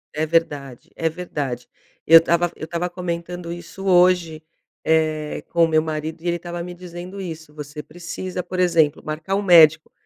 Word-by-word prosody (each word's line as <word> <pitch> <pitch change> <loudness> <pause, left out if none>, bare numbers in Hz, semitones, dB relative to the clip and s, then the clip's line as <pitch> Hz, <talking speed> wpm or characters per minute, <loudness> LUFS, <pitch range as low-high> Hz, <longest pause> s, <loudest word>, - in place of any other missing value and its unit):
É 155 +1 0
verdade, 145 -6 -1
é 165 0 0
verdade, 145 -7 -5 0.4
eu 165 +1 +9
estava 170 +1 +1
eu - - -6
estava 170 +2 -2
comentando 175 -1 -5
isso 175 +3 -9
hoje, 175 -3 +3 0.4
eh, 155 -1 0
com 170 -1 +3
o - - +5
meu 155 -1 +3
marido 160 +1 -4
e 175 - -5
ele 175 - +1
estava 175 0 -6
me 175 0 -7
dizendo 180 +2 -9
isso: 160 -4 -7
"Você 150 0 -7
precisa, 175 +3 -6
por 185 +1 -5
exemplo, 160 -5 +3
marcar 155 +5 -4
um 200 - +1
médico", 160 -5 +6
165 Hz, 175 wpm, -22 LUFS, 155-175 Hz, 0.4 s, eu